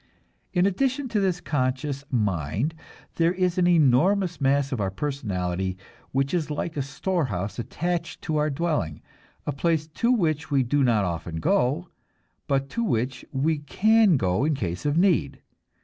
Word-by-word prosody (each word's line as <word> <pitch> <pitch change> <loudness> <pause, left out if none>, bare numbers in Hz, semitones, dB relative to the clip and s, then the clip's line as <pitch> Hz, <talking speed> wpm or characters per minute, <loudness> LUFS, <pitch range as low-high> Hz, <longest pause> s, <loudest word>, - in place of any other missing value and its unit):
In 180 -1 +2
addition 260 +7 0
to 220 - +1
this 185 -3 +1
conscious 135 -3 -1
mind 105 - 0 0.4
there 170 +1 +3
is 185 -1 0
an 175 - +4
enormous 175 +3 +3
mass 140 0 +2
of 125 -5 -1
our 95 - 0
personality 95 -7 -2 0.3
which 135 +1 0
is 165 -4 0
like 155 +2 -3
a 145 - -1
storehouse 130 - -2
attached 170 +7 -3
to 155 -2 -1
our 150 0 +2
dwelling, 145 - -2 0.4
a - - -1
place 155 +2 0
to 230 +10 0
which 160 - +1
we 140 -3 +3
do 140 +3 +1
not 115 -5 +3
often 85 -1 -4
go, 130 - +1 0.6
but 135 -1 +1
to 235 - -1
which 125 - -1
we 150 +2 +1
can 210 +5 +4
go 95 0 +1
in 155 0 +2
case 90 -1 -3
of 145 +2 +1
need. 170 - +2
145 Hz, 160 wpm, -25 LUFS, 120-175 Hz, 0.6 s, an